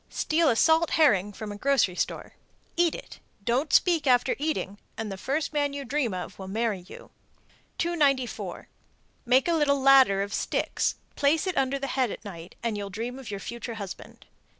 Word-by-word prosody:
Steal 320 0 +1
a 235 - +3
salt 320 +6 +4
herring 210 - +4
from 210 +1 -7
a - - -6
grocery 260 -7 +2
store, - - -3 0.4
eat 340 -1 +2
it, - - -10 0.2
don't 255 +8 0
speak 335 -5 +3
after 250 0 +3
eating, 280 -10 -2 0.2
and 220 -2 -4
the - - -4
first 280 +9 -2
man 290 -1 0
you 280 -1 -5
dream 260 -2 0
of 185 +1 -6
will 190 - -7
marry 215 0 -1
you. 180 - -13 0.7
294. 285 -8 0 0.6
Make 255 +4 +4
a 340 - +2
little 290 -3 +2
ladder 265 -8 +6
of 200 +1 -6
sticks, - - -1 0.2
place 295 +4 +2
it 370 -2 -2
under 270 +1 +1
the 275 - -4
head 260 -2 0
at 210 - -8
night, 170 -3 -9
and 230 -2 -1
you'll 200 -1 -5
dream 235 +6 -5
of 265 - -9
your 200 -1 -4
future 235 +2 -6
husband. 200 -4 -9
255 Hz, 185 wpm, -27 LUFS, 205-290 Hz, 0.7 s, ladder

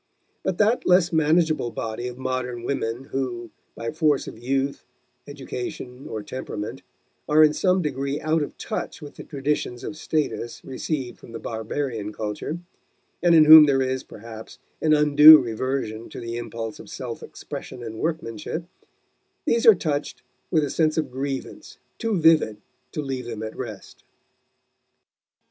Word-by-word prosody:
But 190 -2 -2
that 220 +3 +2
less 180 -1 +4
manageable 160 -3 +2
body 115 +1 -4
of 125 0 -7
modern 130 -2 -3
women 120 -1 -2
who, 120 -3 -3 0.2
by 115 0 -4
force 155 -3 +1
of - - -7
youth, 135 +4 -2 0.4
education, 130 -2 -7
or 110 -1 -5
temperament, 105 -3 -6 0.5
are 155 +1 +6
in 150 -1 +5
some 185 +1 +2
degree 140 0 -2
out 155 +1 +1
of 145 - -5
touch 220 - -4
with 145 -3 -10
the - - -10
traditions 140 -3 -2
of 155 - -5
status 150 -6 -3
received 130 -1 -4
from 115 - -13
the 115 - -5
barbarian 110 -1 -4
culture, 110 +10 -4 0.6
and 175 -1 +5
in 155 -1 +8
whom 155 0 +11
there 135 -2 +3
is, 130 0 -1
perhaps, 110 0 -11 0.2
an 155 -1 +4
undue 150 +1 +9
reversion 115 -2 -3
to - - -8
the 115 0 -5
impulse 115 -1 -5
of - - -11
self - - -6
expression 125 -2 -8
and 110 -1 -7
workmanship 160 -1 -3 0.8
these 235 0 +2
are 220 - +10
touched 150 -4 -3 0.3
with 160 -4 +2
a 140 - -2
sense 155 0 +1
of 155 - -1
grievance 135 +1 -5 0.2
too 225 -4 0
vivid 160 -10 +4 0.3
to 150 - -3
leave 135 -2 -4
them 110 -2 -5
at 110 - -6
rest. - - -8
135 Hz, 155 wpm, -24 LUFS, 120-155 Hz, 0.8 s, whom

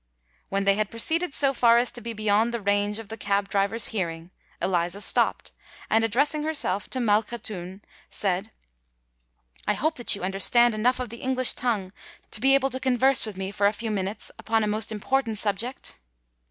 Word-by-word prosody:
When 195 0 -1
they 200 0 +4
had 210 0 -1
proceeded 325 +10 +1
so 275 -1 +4
far 235 -2 +4
as 240 +1 +1
to 240 - -7
be 230 - -5
beyond 215 +1 +1
the 235 - -3
range 205 0 0
of 225 -3 -9
the 225 - -7
cab 200 -1 -1
driver's 200 +3 +1
hearing, 170 -4 -4 0.3
Eliza 175 +1 0
stopped, - - +2 0.4
and, 225 +1 +3
addressing 285 +8 +1
herself 285 -11 -1
to 260 - -2
Malkhatoun, 210 -4 -2 0.3
said, 195 +2 -2 1.2
"I 210 - +2
hope 315 +5 -1
that 240 - +3
you 200 - -9
understand 225 +5 +3
enough 245 +4 +1
of 250 -2 -4
the 235 - -8
English 255 -1 +3
tongue 210 -7 -2 0.4
to - - -3
be 270 +1 +5
able 270 0 +1
to 260 - -3
converse 260 -1 +3
with 205 -3 -8
me 190 0 -4
for 200 0 +2
a 205 - +1
few 225 0 -4
minutes 200 +1 -3
upon 225 0 0
a - - 0
most 215 +1 -1
important 225 +1 -1
subject?" 210 - -2
220 Hz, 185 wpm, -25 LUFS, 200-245 Hz, 1.2 s, be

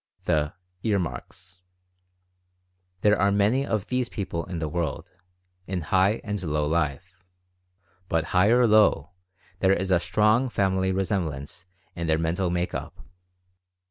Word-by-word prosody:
THE 75 -1 0 0.3
^EAR 105 -3 +1
MARKS." 90 +4 -7 1.4
There 105 -2 +3
are 100 0 +3
many 105 +8 +2
of 105 -3 -1
these 125 -1 -1
people 85 -5 -4
in 90 -2 -6
the 80 -1 -2
world, 80 -2 -3 0.6
in 95 -1 -2
high 95 +6 +2
and 105 -3 -3
low 75 -3 -1
life. 85 +4 -2 0.9
But, 80 -1 +1
high 90 +2 +4
or 120 +1 +5
low, 105 -8 +4 0.5
there 95 0 +4
is 95 +1 -1
a 90 - +4
strong 110 +8 +2
family 95 -3 +1
resemblance 90 -4 -3 0.3
in 85 -1 -3
their 80 0 +3
mental 85 +3 -1
make 90 +1 -2
up. - - -7
95 Hz, 140 wpm, -25 LUFS, 85-100 Hz, 1.4 s, or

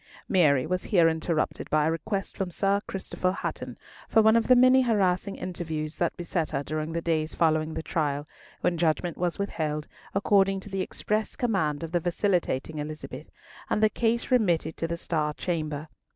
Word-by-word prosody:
Mary 150 -8 +4
was 180 +3 -2
here 175 -5 +4
interrupted 160 0 -1
by 150 -1 +3
a 160 - +2
request 195 +4 -3
from 195 -3 -2
Sir 195 +3 +1
Christopher 185 -1 -2
Hatton - - -5 0.3
for 220 - +5
one 220 +1 +6
of 230 -1 +3
the 255 - +7
many 255 +1 +6
harassing 200 -5 +1
interviews 160 -4 -4
that 170 - 0
beset 170 -2 -2
her 140 -1 -2
during 155 +2 -3
the 170 0 -2
days 160 -2 0
following 155 -1 +1
the - - -3
trial, 145 -4 -1 0.3
when 170 -2 +1
judgment 165 +1 +1
was 175 -1 -1
withheld, 155 -6 -2 0.3
according 195 -1 +3
to 205 - -11
the 195 -1 -1
express 215 +3 -2
command 185 - 0
of 165 - -5
the 175 - +2
vacillating 170 -4 0
Elizabeth, 155 +1 -7 0.4
and 215 - +1
the 215 - +6
case 235 +2 0
remitted 175 -10 +2
to 165 - -2
the 170 0 -3
Star 150 -3 -1
Chamber. 155 -3 -3
170 Hz, 180 wpm, -27 LUFS, 155-195 Hz, 0.4 s, the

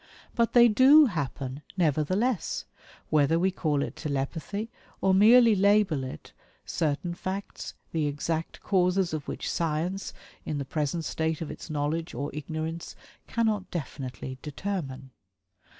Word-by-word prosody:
But 235 -1 +1
they 240 -1 +8
DO 265 +7 +7
happen, 145 - -3 0.2
nevertheless, 185 - +1 0.5
whether 155 +1 +4
we 185 +3 +2
call 150 -6 0
it - - -5
"telepathy" 160 +9 -3 0.3
or 190 - +3
merely 225 +4 +7
label 200 -7 +3
it 130 - -8 0.3
"certain 160 +3 -1
facts, 190 +3 -5 0.2
the 155 -2 0
exact 160 +3 -3
causes 180 -2 +2
of 155 -2 -4
which - - -4
Science 170 +4 -1 0.3
in 150 - -3
the 140 - -3
present 155 +3 -2
state 160 0 -1
of 160 - -5
its 150 - -9
knowledge 155 +3 -2
(or 140 +1 -3
ignorance) 160 +2 -5 0.3
cannot 215 -5 0
definitely 130 -4 -6
determine." 145 -5 -5
165 Hz, 130 wpm, -28 LUFS, 150-195 Hz, 0.5 s, they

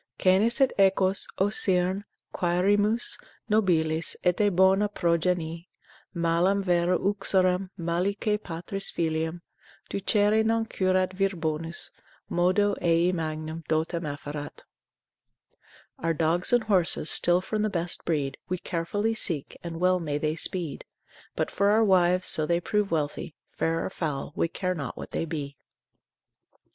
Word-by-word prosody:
Canes 205 +7 +3
et 270 -2 +3
equos 190 0 +3
(o 195 +2 +2
Cyrne) 190 -1 0 0.3
quaerimus 205 +6 +1 0.3
Nobiles, 165 -7 +2
et 180 +2 +2
a 205 - +4
bona 190 +2 +3
progenie; 170 -2 -1 0.4
Malam 170 +4 +1
vero 175 -1 +2
uxorem, 190 -1 +1
malique 200 +5 -1
patris 175 +3 -5
filiam 160 +1 -2 0.5
Ducere 205 +2 +2
non 225 0 +1
curat 185 -3 0
vir 195 0 0
bonus, 165 0 -4 0.4
Modo 185 +4 +2
ei 170 +1 +3
magnam 160 -1 -4
dotem 160 +2 0
afferat, 145 0 -7 1.4
Our 165 0 -1
dogs 165 +3 +1
and 240 -2 +3
horses 185 -6 +3
still 175 +1 +4
from 210 +3 -3
the 215 - +1
best 175 -2 -2
breed 145 -5 -2
We 185 - -1
carefully 185 +6 -2
seek, 165 -9 -1
and 165 -1 -6
well 185 +1 +3
may 150 -4 -2
they 155 +1 -1
speed: 165 -3 0 0.5
But - - -2
for 200 0 +2
our 220 +2 +4
wives, 185 -2 +3
so 155 -1 +3
they 170 +1 +2
prove 205 +3 -1
wealthy, 150 -1 -3 0.2
Fair 165 0 -1
or - - -4
foul, 145 -5 -4
we - - +1
care 185 +2 -3
not 140 -8 -6
what - - -8
they - - -2
be. 145 -4 -6
180 Hz, 135 wpm, -26 LUFS, 165-195 Hz, 1.4 s, a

